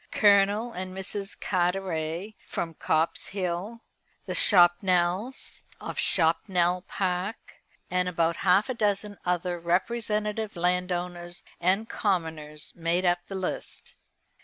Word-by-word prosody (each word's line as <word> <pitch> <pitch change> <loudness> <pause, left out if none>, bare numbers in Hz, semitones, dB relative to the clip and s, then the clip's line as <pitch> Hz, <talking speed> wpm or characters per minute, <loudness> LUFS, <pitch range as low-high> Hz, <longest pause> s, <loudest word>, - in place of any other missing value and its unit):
Colonel 205 +3 +4
and 185 -1 -6
Mrs. 195 +1 -4
Carteret, 180 0 -1
from 165 -1 -3
Copse 160 +3 -1
Hall; 195 +4 -3 0.4
the - - -4
Chopnells, 180 +4 +4 0.2
of - - -7
Chopnell 175 +1 +2
Park; 185 +3 -3 0.3
and 180 0 +1
about 165 -1 0
half 195 +4 +3
a 260 - -2
dozen 205 -2 -1
other 180 0 -1
representative 210 +4 -1
landowners 175 0 -2 0.2
and 190 +6 +1
commoners 160 -8 -2
made 170 +2 0
up 175 0 +3
the 195 - -6
list. 190 -1 -4
180 Hz, 110 wpm, -27 LUFS, 175-200 Hz, 0.4 s, Colonel